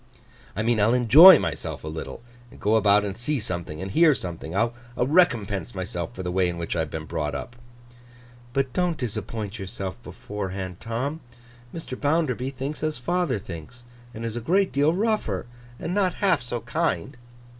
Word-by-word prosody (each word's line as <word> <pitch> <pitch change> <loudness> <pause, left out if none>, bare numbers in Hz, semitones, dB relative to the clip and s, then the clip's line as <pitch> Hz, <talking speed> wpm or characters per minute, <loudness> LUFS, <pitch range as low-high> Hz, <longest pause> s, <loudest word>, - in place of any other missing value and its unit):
'I 105 - -1
mean, 115 -1 +2
I'll 115 +4 +4
enjoy 150 - +10
myself - - -4
a - - -6
little, 80 +8 -6 0.3
and - - -16
go 105 +2 +2
about 105 -1 +4
and 100 -1 -4
see 125 +5 -1
something, 90 -6 -5
and 95 - -5
hear 160 - +5
something. 85 -4 -6
I'll 115 +3 +1 0.2
recompense 120 - +2
myself 90 -2 -4
for 95 - -5
the 90 - -2
way 90 0 +2
in 85 - -4
which 85 0 -3
I - - 0
have 80 -1 -1
been 80 +1 -5
brought 75 -3 -3
up.' 120 - -6 1.0
'But 135 0 -1
don't 180 -3 0
disappoint 110 -2 -4
yourself 95 +2 -6
beforehand, 95 -5 -6
Tom. 130 +7 -3 0.5
Mr. 165 -6 -6
Bounderby 145 -4 +1
thinks 135 +3 -5
as 155 0 -1
father 175 +1 0
thinks, 95 +5 -9 0.3
and 115 -1 -6
is 115 -1 -3
a 120 - -3
great 190 - +2
deal 145 +4 +3
rougher, 195 - 0 0.3
and 170 - -3
not 190 -3 +1
half 190 -8 +2
so 120 -1 -4
kind. 150 +1 -1
115 Hz, 175 wpm, -25 LUFS, 95-145 Hz, 1.0 s, enjoy